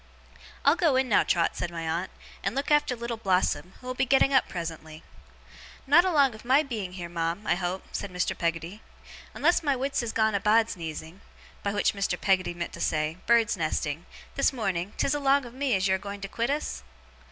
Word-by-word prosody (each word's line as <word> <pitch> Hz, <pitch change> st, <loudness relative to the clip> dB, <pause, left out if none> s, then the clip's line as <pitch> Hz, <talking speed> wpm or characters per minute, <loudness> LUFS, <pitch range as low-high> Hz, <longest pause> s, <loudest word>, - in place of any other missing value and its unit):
'I'll 285 Hz, +3 st, +6 dB
go 320 Hz, -7 st, +3 dB
in 260 Hz, 0 st, +2 dB
now, 215 Hz, -, +4 dB
Trot,' 170 Hz, -2 st, +1 dB
said 175 Hz, -, -3 dB
my 165 Hz, -1 st, -5 dB
aunt, 170 Hz, +4 st, -2 dB, 0.3 s
'and -, -, -1 dB
look 275 Hz, +2 st, -2 dB
after 295 Hz, -4 st, +3 dB
Little 235 Hz, 0 st, -4 dB
Blossom, 185 Hz, -4 st, 0 dB
who -, -, -16 dB
will 255 Hz, -, -3 dB
be 255 Hz, -, 0 dB
getting 275 Hz, +1 st, +4 dB
up 265 Hz, -, +3 dB
presently.' 160 Hz, -2 st, -6 dB, 0.8 s
'Not 295 Hz, +6 st, +6 dB
along 285 Hz, -8 st, +3 dB
of 215 Hz, -, -12 dB
my 265 Hz, +5 st, +4 dB
being 215 Hz, -10 st, -5 dB
heer, 175 Hz, -2 st, -6 dB
ma'am, 170 Hz, +3 st, -3 dB
I -, -, +3 dB
hope?' 180 Hz, +1 st, -3 dB
said 200 Hz, -, -4 dB
Mr. 180 Hz, 0 st, -1 dB
Peggotty. 170 Hz, +4 st, -3 dB, 0.5 s
'Unless 345 Hz, -, +3 dB
my 285 Hz, -4 st, +1 dB
wits 270 Hz, +1 st, -1 dB
is 235 Hz, -2 st, -3 dB
gone 220 Hz, -1 st, +2 dB
a 200 Hz, -, +1 dB
bahd's 220 Hz, +2 st, +3 dB
neezing' 165 Hz, +1 st, -7 dB, 0.4 s
by 200 Hz, -, -1 dB
which 205 Hz, 0 st, +1 dB
Mr. 200 Hz, -1 st, -1 dB
Peggotty 185 Hz, -3 st, +1 dB
meant 170 Hz, 0 st, -5 dB
to -, -, -7 dB
say, 155 Hz, +1 st, 0 dB
bird's 230 Hz, -2 st, +4 dB
nesting 155 Hz, -1 st, -2 dB, 0.3 s
'this 275 Hz, -, +2 dB
morning, 195 Hz, -6 st, -2 dB
'tis 275 Hz, -, +1 dB
along 280 Hz, -1 st, +2 dB
of 240 Hz, -, -10 dB
me 265 Hz, -3 st, 0 dB
as 190 Hz, 0 st, +1 dB
you're 190 Hz, 0 st, +2 dB
a -, -, -16 dB
going 200 Hz, +1 st, -7 dB
to 195 Hz, -, -4 dB
quit 235 Hz, +5 st, -2 dB
us? 290 Hz, -, -2 dB
205 Hz, 210 wpm, -27 LUFS, 175-260 Hz, 0.8 s, I'll